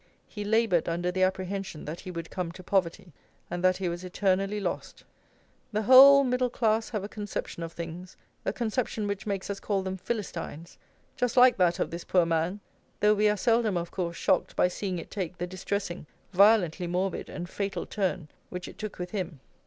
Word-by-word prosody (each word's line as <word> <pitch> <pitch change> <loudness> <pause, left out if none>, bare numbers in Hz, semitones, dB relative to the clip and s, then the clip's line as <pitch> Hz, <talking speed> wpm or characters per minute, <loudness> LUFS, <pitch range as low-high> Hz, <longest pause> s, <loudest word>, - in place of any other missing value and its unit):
"He 210 - -6
laboured 210 -6 +2
under 175 +2 -1
the 185 +1 -2
apprehension 190 -2 -1
that 160 +3 -5
he 185 - -8
would 170 -2 -6
come 180 -3 -3
to 185 - -11
poverty, 180 -2 -1 0.4
and 175 +1 -3
that 185 0 +4
he 190 - -2
was 175 +1 -4
eternally 195 +2 0
lost." 200 - -4 0.7
The 215 0 0
whole 275 +4 +9
middle 250 -1 +1
class 225 -2 +1
have 210 -4 -3
a - - -3
conception 205 -5 -5
of 165 0 -5
things, 170 +2 -7 0.3
a - - 0
conception 220 0 -2
which 200 +1 -3
makes 195 -2 -2
us 200 -1 -4
call 200 -2 -1
them 190 0 -3
Philistines, 175 -6 -5 0.4
just 250 -1 -1
like 250 0 +8
that 175 -2 +3
of - - -1
this 170 +1 -5
poor 180 -2 +3
man; 165 +4 0 0.4
though 210 0 +5
we 210 0 +3
are 210 - +1
seldom, 225 -3 +2
of 170 0 -4
course, 170 -3 -3
shocked - - +1
by - - +4
seeing 185 0 -3
it 170 - -8
take 180 -3 -4
the 175 - -2
distressing, 185 -2 -4 0.3
violently 185 -3 +4
morbid, 180 +1 -2
and 175 0 -6
fatal 200 +2 -3
turn, 185 -5 -2 0.2
which 180 0 -6
it - - -12
took 215 -2 -5
with 180 0 -5
him. 180 -8 -4
190 Hz, 195 wpm, -28 LUFS, 175-210 Hz, 0.7 s, whole